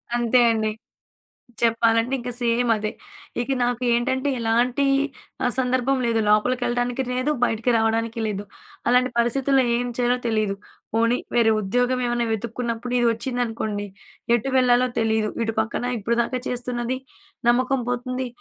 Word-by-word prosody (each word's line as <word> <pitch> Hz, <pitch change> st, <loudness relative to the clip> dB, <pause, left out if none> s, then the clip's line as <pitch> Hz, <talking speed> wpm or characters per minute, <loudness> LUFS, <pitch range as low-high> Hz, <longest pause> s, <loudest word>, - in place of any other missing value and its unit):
అంతే 240 Hz, +1 st, +3 dB
అండి. 215 Hz, -1 st, 0 dB, 0.9 s
చెప్పాలంటే 230 Hz, +1 st, +2 dB
ఇంక 245 Hz, +1 st, -5 dB
సేమ్ 235 Hz, 0 st, +1 dB
అదే. 215 Hz, 0 st, -2 dB, 0.5 s
ఇక 245 Hz, -, -3 dB
నాకు 245 Hz, 0 st, 0 dB
ఏంటంటే, 260 Hz, +3 st, 0 dB
ఎలాంటి 240 Hz, +4 st, +1 dB, 0.6 s
ఆ! -, -, +3 dB
సందర్భం 255 Hz, +1 st, +1 dB
లేదు. 225 Hz, -1 st, +1 dB
లోపలికెళ్ళడానికి 245 Hz, +3 st, +1 dB
లేదు. 255 Hz, +4 st, 0 dB
బయటికి 230 Hz, +1 st, 0 dB
రావడానికి 225 Hz, +1 st, 0 dB
లేదు. 205 Hz, -1 st, -3 dB, 0.4 s
అలాంటి 250 Hz, +1 st, +3 dB
పరిస్థితుల్లో 265 Hz, +3 st, +2 dB
ఏం 245 Hz, +1 st, -1 dB
చేయాలో 245 Hz, 0 st, +2 dB
తెలీదు? 215 Hz, -3 st, 0 dB, 0.4 s
పోనీ 230 Hz, +2 st, +2 dB, 0.2 s
వేరే 230 Hz, -2 st, +4 dB
ఉద్యోగం 245 Hz, +5 st, 0 dB
ఏమన్నా 240 Hz, -1 st, 0 dB
వెతుక్కున్నప్పుడు 235 Hz, +2 st, -3 dB
ఇది 240 Hz, -, +3 dB
వచ్చిందనుకోండి. 225 Hz, -4 st, -3 dB, 0.5 s
ఎటు 255 Hz, +4 st, -3 dB
వెళ్ళాలో 250 Hz, 0 st, +4 dB
తెలీదు. 220 Hz, -1 st, +1 dB
ఇటు 225 Hz, 0 st, -2 dB
పక్కన 225 Hz, +2 st, -2 dB
ఇప్పటిదాకా 235 Hz, +4 st, 0 dB
చేస్తున్నది 245 Hz, 0 st, -2 dB, 0.5 s
నమ్మకం 255 Hz, +2 st, +2 dB
పోతుంది. 255 Hz, +1 st, -2 dB
240 Hz, 125 wpm, -23 LUFS, 225-250 Hz, 0.9 s, వేరే